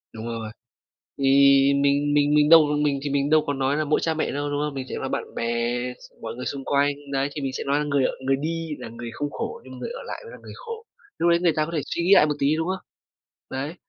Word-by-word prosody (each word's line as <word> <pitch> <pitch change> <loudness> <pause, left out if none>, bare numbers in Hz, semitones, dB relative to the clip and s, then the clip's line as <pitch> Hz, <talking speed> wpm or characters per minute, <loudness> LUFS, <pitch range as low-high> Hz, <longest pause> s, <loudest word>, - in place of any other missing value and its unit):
Đúng 110 0 -7
rồi. 115 -2 -4 0.7
Thì, 140 - -4 0.6
mình 145 +1 +2
mình 145 0 +3
mình 150 0 +4
đâu 165 -2 +9 0.2
mình 140 -2 +1
thì 145 - -2
mình 140 0 0
đâu 155 0 +5
có 145 - 0
nói 135 +1 0
là 155 - 0
mỗi 150 - +2
cha 165 - +1
mẹ 160 - -1
đâu, 145 +1 -2
đúng 145 0 -2
hông? 150 -1 -2
Mình 135 -1 -5
sẽ - - -4
nói - - -4
bạn - - -4
bè, - - -2 0.6
s - - -15
mọi 115 0 -6
người 125 - -6
xung 140 -1 -4
quanh. 140 0 +2 0.2
Đấy, 135 +1 0
thì 150 - -4
mình 135 -1 -2
sẽ - - -4
nói 140 +1 +1
là 150 - -1
người 140 -2 +1
ở - - +1
người 135 0 +3
đi 165 +1 -3
là - - -7
người 115 +1 -7
không 145 0 -4
khổ 465 +1 -5
nhưng - - -11
người - - -5
ở 485 +1 -7
lại - - -6
mới 470 - -11
là - - -10
người - - -11
khổ, 460 -1 -8 0.3
lúc 170 - +2
đấy 170 0 +4
người 175 -2 +2
ta 155 - +1
có 165 - -7
thể 155 -3 -1
suy 170 - -3
nghĩ 185 +3 +5
lại 175 - +7
một 150 -1 -1
tí, 145 +3 +2
đúng 160 +2 -1
không? 190 0 -3 0.7
Đấy. 140 +5 -4
145 Hz, 285 wpm, -24 LUFS, 140-160 Hz, 0.7 s, đâu